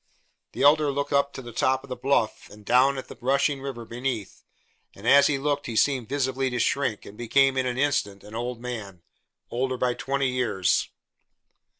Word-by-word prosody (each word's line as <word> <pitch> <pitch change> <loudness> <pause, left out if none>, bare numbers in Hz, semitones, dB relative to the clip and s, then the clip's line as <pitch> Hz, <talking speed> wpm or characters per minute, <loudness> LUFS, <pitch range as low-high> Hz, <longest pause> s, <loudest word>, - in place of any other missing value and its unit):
The - - -2
Elder 150 +1 +5
looked 140 +1 -2
up 140 0 +2
to 135 - -8
the 120 - -9
top 130 +3 +1
of 140 - -14
the 125 - -3
bluff 130 -5 0
and 105 0 -15
down 130 +4 +4
at 130 - -6
the - - -10
rushing 140 +2 +1
river 130 -4 -6
beneath, 120 -4 -4 0.5
and 100 +4 -8
as 140 +2 +7
he 150 - +1
looked 145 +1 -1
he 115 - -5
seemed 130 -1 +1
visibly 130 -1 0
to 125 - -3
shrink 130 -5 0
and 100 - -11
become 135 +4 +2
in 130 -1 0
the - - -4
instant 105 -9 -1
an 105 - -13
old 120 +1 -4
man 110 -8 -7 0.5
older 130 +1 -1
by 125 0 +1
twenty 135 +1 -1
years. 120 -8 +1
130 Hz, 195 wpm, -25 LUFS, 120-140 Hz, 0.5 s, as